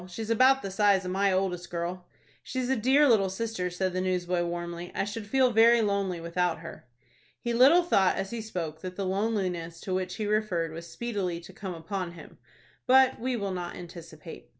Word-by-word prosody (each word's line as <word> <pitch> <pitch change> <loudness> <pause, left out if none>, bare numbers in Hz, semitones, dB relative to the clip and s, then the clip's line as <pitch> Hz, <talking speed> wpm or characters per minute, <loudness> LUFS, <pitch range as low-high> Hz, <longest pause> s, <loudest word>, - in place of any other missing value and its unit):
She 185 +5 -6
is 220 - -4
about 260 +4 +4
the 195 - -4
size 195 -1 +3
of 180 - -3
my 195 +1 +2
oldest 185 -2 -1
girl." 175 +1 -4 0.3
"She's 255 -1 -3
a - - +3
dear 265 +6 +4
little 210 -6 +4
sister," 190 -2 -3
said 185 +1 -2
the 185 - -1
newsboy, 180 -1 0
warmly. 175 0 -5
"I - - 0
should 210 +1 -6
feel 260 +2 +3
very 230 +1 +5
lonely 200 -4 -1
without 170 0 -1
her." 165 -5 -10 0.5
He 235 - -2
little 275 +9 +6
thought 195 - +3
as 195 0 -4
he 235 -1 -4
spoke 170 -8 -5
that 185 -1 -6
the 195 - -3
loneliness 185 -4 -2
to 185 - -4
which 185 0 -2
he 215 - -3
referred 205 -6 0
was 165 +1 -8
speedily 200 -8 -3
to 190 - -13
come 190 -2 -6
upon 175 +1 -5
him. 170 - -13 0.5
But 265 0 +5
we 250 +2 -1
will 200 -4 -3
not 175 -1 -5
anticipate. 165 - -11
190 Hz, 200 wpm, -28 LUFS, 175-225 Hz, 0.5 s, little